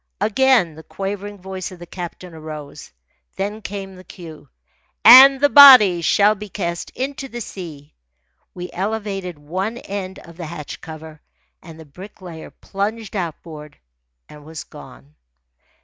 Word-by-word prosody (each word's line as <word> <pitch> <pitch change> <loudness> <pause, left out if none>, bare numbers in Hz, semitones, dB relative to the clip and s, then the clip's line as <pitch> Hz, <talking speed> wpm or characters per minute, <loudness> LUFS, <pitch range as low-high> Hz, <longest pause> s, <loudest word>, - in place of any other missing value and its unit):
Again 220 -3 +2
the 160 - -12
quavering 200 +3 -6
voice 190 0 -7
of 185 - -11
the 175 - -11
captain 175 0 -9
arose. 155 -2 -10 0.4
Then 205 +3 -4
came 195 -2 -7
the 185 - -14
cue: 165 -3 -13 0.6
"And 265 +4 +10
the 290 - +4
body 255 - +8
shall 205 +5 +3
be 210 0 -10
cast 170 -1 -5
into 270 +1 -5
the 240 -2 -8
sea." 160 -9 -10 0.6
We 180 0 -7
elevated 195 -3 -4
one 185 +10 -4
end 195 -4 -7
of 170 0 -15
the 170 -3 -7
hatch 155 -2 -9
cover, 155 -1 -11 0.4
and 165 -2 -13
the 160 - -12
Bricklayer 180 +1 -12
plunged 215 +2 -5
outboard 160 -4 -7 0.5
and 150 -1 -15
was 155 0 -9
gone. 70 +4 -15
185 Hz, 140 wpm, -20 LUFS, 160-205 Hz, 0.6 s, And